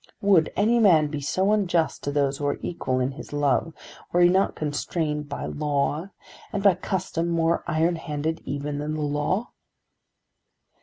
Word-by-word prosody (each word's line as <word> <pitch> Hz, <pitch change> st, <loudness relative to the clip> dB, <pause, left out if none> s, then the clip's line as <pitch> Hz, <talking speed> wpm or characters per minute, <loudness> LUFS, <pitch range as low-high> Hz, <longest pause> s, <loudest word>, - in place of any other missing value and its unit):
Would 190 Hz, -6 st, +3 dB
any 225 Hz, +4 st, +3 dB
man 165 Hz, -9 st, +5 dB
be 150 Hz, -2 st, -3 dB
so 185 Hz, +8 st, +1 dB
unjust 180 Hz, -6 st, +1 dB
to 145 Hz, -, -1 dB
those 140 Hz, -1 st, 0 dB
who 145 Hz, -, -1 dB
are 145 Hz, -, 0 dB
equal 130 Hz, -7 st, -2 dB
in 130 Hz, +1 st, 0 dB
his 140 Hz, -, -10 dB
love, 145 Hz, +1 st, +1 dB, 0.4 s
were 175 Hz, -, +3 dB
he 175 Hz, -, +7 dB
not 190 Hz, +2 st, +2 dB
constrained 150 Hz, 0 st, -2 dB
by -, -, -4 dB
law, 150 Hz, +4 st, -1 dB, 0.4 s
and 200 Hz, -, -2 dB
by 200 Hz, -2 st, +6 dB
custom 175 Hz, -2 st, -2 dB
more 165 Hz, 0 st, +1 dB
iron 165 Hz, +2 st, +1 dB
handed 160 Hz, 0 st, -3 dB
even 145 Hz, +1 st, -4 dB
than 150 Hz, +1 st, -3 dB
the 155 Hz, -, -3 dB
law?" 150 Hz, +9 st, -1 dB
155 Hz, 165 wpm, -25 LUFS, 145-175 Hz, 0.4 s, he